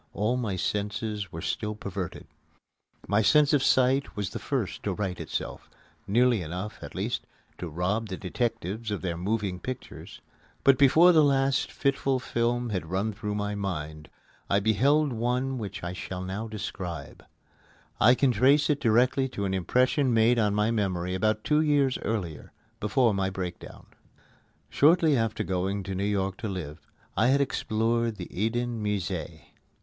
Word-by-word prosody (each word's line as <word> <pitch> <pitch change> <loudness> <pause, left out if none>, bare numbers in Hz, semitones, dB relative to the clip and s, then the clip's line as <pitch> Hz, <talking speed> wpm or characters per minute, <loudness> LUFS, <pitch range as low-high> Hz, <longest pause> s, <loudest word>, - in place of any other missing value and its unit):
All 110 +5 0
my 115 -6 -2
senses 105 0 -2
were 80 0 -7
still 105 -1 -2
perverted. 100 -4 -6 0.8
My 105 +2 +3
sense 150 +5 +4
of 145 - +4
sight 130 +1 +2
was 100 -2 -3
the - - -5
first 125 -9 -3
to 100 - -2
right 95 -2 -3
itself - - -5 0.4
nearly 120 +1 +3
enough, 90 +6 -5
at - - -9
least, - - -3 0.3
to 90 - -5
rob 95 +8 -1
the 95 - -4
detectives 110 +1 -3
of 105 -2 -3
their 85 -3 -2
moving 95 +1 -2
pictures. 130 +6 -8 0.4
But 135 -2 +5
before 155 +6 +7
the 160 -3 +5
last 135 -1 +2
fitful 135 -1 0
film 120 -1 -1
had 90 -5 -3
run 100 +4 -1
through 105 0 -4
my 105 0 -2
mind, 80 -7 -5 0.4
I 100 - +3
beheld 135 +8 +2
one 125 +3 -1
which 100 -3 -6
I 90 +1 -3
shall 90 0 -6
now 95 +5 -4
describe. 100 -5 -6 0.8
I 120 +3 +6
can 135 0 +3
trace 135 +7 +4
it 145 - -1
directly 125 +3 +3
to 100 -5 -3
an 95 - -1
impression 125 - +2
made 115 +2 +4
on 105 -2 +2
my 105 +2 +2
memory 90 -5 -1
about 110 +3 0
two 150 0 +3
years 145 -4 +2
earlier, 90 -9 -4 0.3
before 115 +1 +2
my 95 -1 0
breakdown. 95 -2 -7 0.8
Shortly 160 0 +4
after 115 -3 0
going 95 +2 -2
to 95 0 -5
New 95 +1 -2
York 95 -2 -1
to 115 - -4
live, 85 -5 -5 0.4
I 110 - +3
had 135 +2 +4
explored 115 -3 0
the 90 -4 -7
Eden 115 +2 -1
Musée. 105 -6 -3
110 Hz, 160 wpm, -27 LUFS, 95-125 Hz, 0.8 s, before